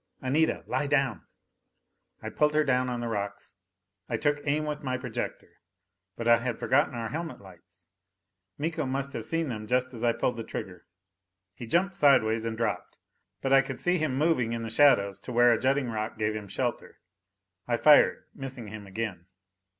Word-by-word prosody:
"Anita, 150 +5 +1
lie 145 - -1
down." 135 - 0 1.0
I - - -5
pulled 150 0 +1
her 155 - +4
down 130 -2 +1
on 120 -1 -3
the 120 - -3
rocks. 100 -3 -4 0.6
I 115 - 0
took 145 +3 +1
aim 150 +2 +1
with 150 0 -4
my 130 -3 -2
projector. 125 -3 -6 0.6
But 115 - -4
I 120 0 +7
had 120 -1 -3
forgotten 140 -1 +2
our 115 -1 -3
helmet 160 +5 -5
lights. 90 -2 -17 0.7
Miko 155 -1 -2
must 135 +1 -3
have - - -5
seen 165 -2 -1
them 110 -3 -5
just 125 +1 0
as 115 -1 -7
I 120 -1 +3
pulled 125 +1 -1
the 115 - -4
trigger. 90 -5 -7 0.7
He 120 - -8
jumped 185 - +1
sidewise 115 -7 +3
and 115 -1 -3
dropped, 115 - -3 0.5
but 135 0 +2
I 135 - +7
could 135 -1 -6
see 180 0 +1
him 150 -4 -1
moving 135 -7 +1
in 115 0 -3
the 115 - -5
shadows 115 -7 +4
to - - -8
where 120 0 +5
a 115 - 0
jutting 135 0 +1
rock 110 0 -4
gave 110 0 -1
him 105 -2 -6
shelter. 120 +5 -3 0.7
I 120 -1 +1
fired, 150 +4 +5
missing 130 -5 -7
him 105 -1 -9
again. 95 -3 -5
125 Hz, 185 wpm, -28 LUFS, 110-145 Hz, 1.0 s, I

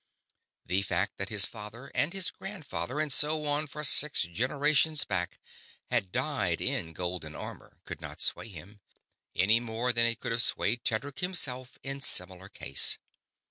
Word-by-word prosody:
The 90 +3 0
fact 95 +1 -1
that 100 0 -5
his 105 -3 +5
father 115 +4 -10
and 150 - 0
his 190 -1 -1
grandfather 160 -7 -6
and 155 -2 +2
so 150 +1 +3
on 145 +1 -1
for 150 +2 -7
six 150 +1 +6
generations 145 - +1
back 90 -3 -3 0.5
had 95 - 0
died - - -1
in 80 - -1
golden 85 -2 -5
armor - - -10
could - - -9
not - - -7
sway - - +1
him, 100 +2 -12 0.5
any 105 +5 +4
more 120 +1 -2
than 115 +1 +4
it 115 0 -1
could - - -4
have 115 +1 +2
swayed 115 +1 0
Tedric 135 +5 -2
himself 135 -9 +2
in 135 0 -4
similar 95 -5 +1
case. - - +2
115 Hz, 160 wpm, -29 LUFS, 100-145 Hz, 0.5 s, six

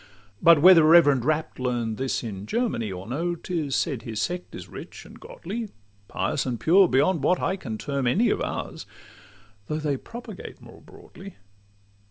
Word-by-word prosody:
But 165 -3 +6
whether 180 -3 +8
reverend 150 -6 +5
Rapp 155 -1 -1
learn'd 120 -3 -2
this 130 -1 -2
in 105 -3 -7
Germany 215 - -1
Or 90 0 -7
no, 165 - -2
'tis 160 -5 -3
said 135 -8 -1
his 110 -2 -6
sect 180 0 -4
is - - -9
rich - - -10
and - - -14
godly, 350 - -7 0.4
Pious - - -2
and 125 -3 -3
pure, 185 +3 +5
beyond 145 +3 +2
what 180 +5 +2
I 190 - -1
can 115 - -6
term 140 +1 -2
any 210 - +2
Of - - -1
ours, - - -5 0.8
although 155 - -2
they 140 -2 0
propagate 240 - -10
more - - -15
broadly. 195 0 -14
150 Hz, 170 wpm, -25 LUFS, 125-180 Hz, 0.8 s, whether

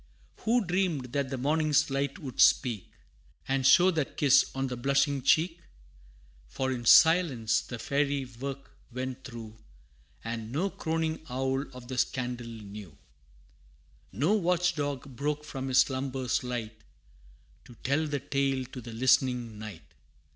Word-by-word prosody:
Who 230 0 +1
dreamed 170 -9 -1
that 140 -2 -1
the 135 - -3
morning's 155 +2 +2
light 140 +2 -1
would 140 -9 -3
speak, 115 -8 +3 0.6
And 135 -1 +2
show 180 +6 +6
that 155 -5 -3
kiss 140 -3 +5
on 135 0 -1
the 125 -1 -3
blushing 140 +2 +1
cheek? 165 +6 +2 0.9
For 130 - -2
in 120 -2 -4
silence 125 -4 +5
the 120 - -7
fairy 140 +2 0
work 135 +3 -7 0.2
went 130 +1 -5
through 115 -3 -9 0.7
And 115 -1 -5
no 180 +9 -1
croning 160 -1 -2
owl 135 +2 -1
of 125 -1 -11
the 130 0 -3
scandal 125 -2 -2
knew: 105 -8 -10 1.1
No 145 - +1
watch 180 -3 +2
dog 140 -3 -4
broke 150 +3 -2
from 135 -3 -6
his 130 -1 +1
slumbers 130 -2 -1
light, 115 -3 -5 0.8
To 120 - -14
tell 145 +4 +1
the 145 -1 -2
tale 135 -1 -1
to 125 - -7
the 115 0 -9
listening 120 -2 +1
night. 105 -7 -8
135 Hz, 140 wpm, -29 LUFS, 125-145 Hz, 1.1 s, show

